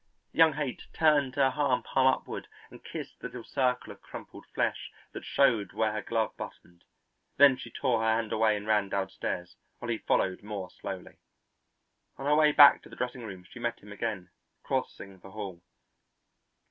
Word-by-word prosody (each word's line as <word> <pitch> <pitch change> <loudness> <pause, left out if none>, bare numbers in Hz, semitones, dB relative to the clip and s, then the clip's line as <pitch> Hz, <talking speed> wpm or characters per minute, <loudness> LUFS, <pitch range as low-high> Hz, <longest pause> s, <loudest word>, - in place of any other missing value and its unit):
Young 160 -1 +5
Haight 140 -3 -4
turned 145 -5 +3
her 135 -2 +4
hand 135 -2 +1
palm 130 -1 +2
upward 130 - -1 0.2
and - - -13
kissed - - -7
the - - -5
little - - -9
circle 125 -2 -1
of - - -22
crumpled - - -11
flesh - - -2 0.2
that - - -8
showed 115 -8 +2
where 110 -1 +1
her 105 0 -3
glove 115 0 -1
buttoned. 85 0 -10 0.5
Then 140 -1 +8
she - - -9
tore 125 -5 0
her 110 0 +3
hand 115 -1 -2
away 110 -1 +3
and 105 - -7
ran 105 -2 +2
downstairs, 95 -3 -3 0.2
while 120 - -7
he 115 - -1
followed 95 - +1
more 100 -3 -6
slowly. 95 -2 -8 1.0
On 135 - -6
her 145 - +3
way 155 0 +5
back 145 -1 +8
to - - -15
the - - -11
dressing 125 0 -3
room 95 -5 -8
she 125 - -12
met 120 0 -2
him 105 - -14
again, 105 -4 -4 0.3
crossing 95 -1 -3
the 95 - -13
hall. 95 -4 -7
110 Hz, 180 wpm, -29 LUFS, 100-130 Hz, 1.0 s, Then